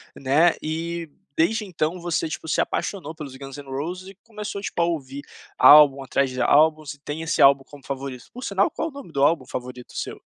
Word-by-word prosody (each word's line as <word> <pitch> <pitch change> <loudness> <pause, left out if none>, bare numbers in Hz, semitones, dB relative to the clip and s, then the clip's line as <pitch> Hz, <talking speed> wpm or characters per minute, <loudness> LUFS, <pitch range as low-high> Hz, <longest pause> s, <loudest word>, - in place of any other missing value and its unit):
né, 145 +6 +3
e 165 +1 -4 0.3
desde 215 +7 +2
então 175 -2 -2
você 170 -1 -1
tipo 160 0 -6
se - - 0
apaixonou 165 -5 -2
pelos 140 -4 -8
Guns 135 +1 -9
N' 145 - -9
Roses 175 +8 -5
e 195 - -13
começou 210 -2 -6
a - - -9
tipo 175 - -3
a - - +4
ouvir 140 -4 -4 0.3
álbum 145 -2 +8
atrás 135 +1 0
de 130 -1 -4
álbuns 155 +2 +3
e 145 - -19
tem 150 +2 -6
esse 165 - -1
álbum 135 0 +6
como 145 -1 -15
favorito 135 -2 -6
Por 250 +2 -8
sinal 200 0 +1
qual 325 - -3
o - - -15
nome 275 -11 -11
do 140 - -2
álbum 145 -3 +3
favorito 125 0 -7
seu? - - -5
155 Hz, 215 wpm, -23 LUFS, 140-170 Hz, 0.3 s, álbum